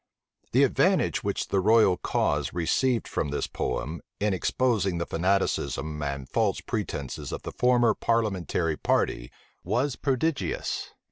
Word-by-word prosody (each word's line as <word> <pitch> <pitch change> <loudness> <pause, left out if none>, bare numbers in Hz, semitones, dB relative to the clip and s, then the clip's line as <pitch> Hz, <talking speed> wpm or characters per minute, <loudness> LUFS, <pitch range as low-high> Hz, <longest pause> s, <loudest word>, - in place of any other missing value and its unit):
The - - +5
advantage - - +2
which - - -2
the 100 - +2
royal 105 -1 +5
cause 75 -4 0
received 115 +9 +1
from 75 - -2
this 75 - -1
poem, 70 +5 -3 0.2
in 105 -1 +1
exposing 100 -2 +1
the 85 - -2
fanaticism 80 -5 -1
and 70 -2 -3
false 105 +5 +1
pretences 85 - -4
of - - -5
the - - -5
former 120 -2 +3
parliamentary 95 -8 0
party, - - 0 0.3
was 130 +2 0
prodigious. 135 - -1
95 Hz, 130 wpm, -27 LUFS, 75-115 Hz, 0.3 s, The